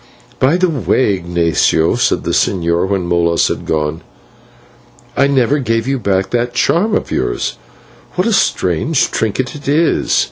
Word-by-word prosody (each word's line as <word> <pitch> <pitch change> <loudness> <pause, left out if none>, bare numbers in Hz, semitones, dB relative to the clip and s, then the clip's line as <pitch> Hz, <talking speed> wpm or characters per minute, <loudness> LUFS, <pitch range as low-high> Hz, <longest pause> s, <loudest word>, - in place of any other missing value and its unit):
"By 140 +7 +3
the 185 0 +2
way, 130 - +1
Ignatio," 85 -2 +1
said - - 0
the - - -2
señor 85 -1 +1
when 95 -3 -1
Molas 85 -1 +1
had - - -5
gone, 75 +1 -1 1.1
"I 140 - +3
never 140 +1 +2
gave 115 -2 -1
you 135 -1 0
back 95 -3 -1
this 120 0 0
charm 205 +11 +2
of - - -3
yours. - - -2 0.6
What 180 - 0
a 230 - +1
strange 110 - +1
trinket 110 +4 -2
it 145 -1 -10
is!" 155 +4 +2
115 Hz, 150 wpm, -15 LUFS, 85-140 Hz, 1.1 s, By